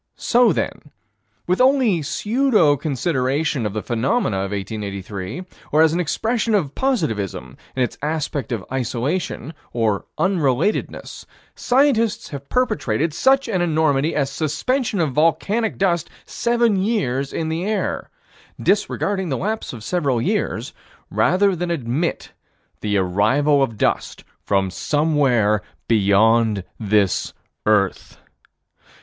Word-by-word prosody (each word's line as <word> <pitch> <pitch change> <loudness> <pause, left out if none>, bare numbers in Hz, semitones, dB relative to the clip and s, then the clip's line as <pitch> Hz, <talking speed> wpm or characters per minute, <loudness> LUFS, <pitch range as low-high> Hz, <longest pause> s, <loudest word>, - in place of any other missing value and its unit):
So 240 -2 +4
then, 150 - -3 0.6
with 180 +6 +1
only 255 - +4
pseudo 215 - +2
consideration 135 -2 -1
of 100 - -6
the 110 - -3
phenomena 120 - 0
of 95 0 -2
1883, 100 - -5 0.3
or 155 +2 +5
as 160 -1 +3
an 175 - 0
expression 220 +6 0
of 150 -9 0
positivism 110 - -2 0.2
in 130 - +2
its 125 - -4
aspect 150 -5 -2
of 110 -6 -3
isolation, 135 +4 -2 0.2
or 110 -4 0
unrelatedness, 170 - -1 0.3
scientists 235 -4 +1
have 140 -1 -8
perpetrated 155 - 0
such 270 - +3
an 190 -6 0
enormity 155 -2 +1
as 140 -2 0
suspension 225 - -1
of 155 -4 +1
volcanic 165 - +1
dust 175 -4 +1 0.2
seven 235 -3 +1
years 140 - 0
in 160 -1 -2
the 165 +2 -2
air 210 +2 -2 0.5
disregarding 190 -3 0
the 135 - -1
lapse 215 - -3
of 115 -4 -9
several 140 -6 0
years - - -1 0.4
rather 190 +2 +3
than 175 +1 -3
to 170 - +1
admit 135 +5 -2 0.5
the 105 -1 0
arrival 110 +11 +2
of 115 -5 -1
dust - - -1 0.2
from 95 -2 0
somewhere 135 - +2 0.3
beyond 110 0 +3 0.2
this 105 -3 +1 0.3
earth. 105 -3 +1
150 Hz, 120 wpm, -21 LUFS, 115-190 Hz, 0.6 s, or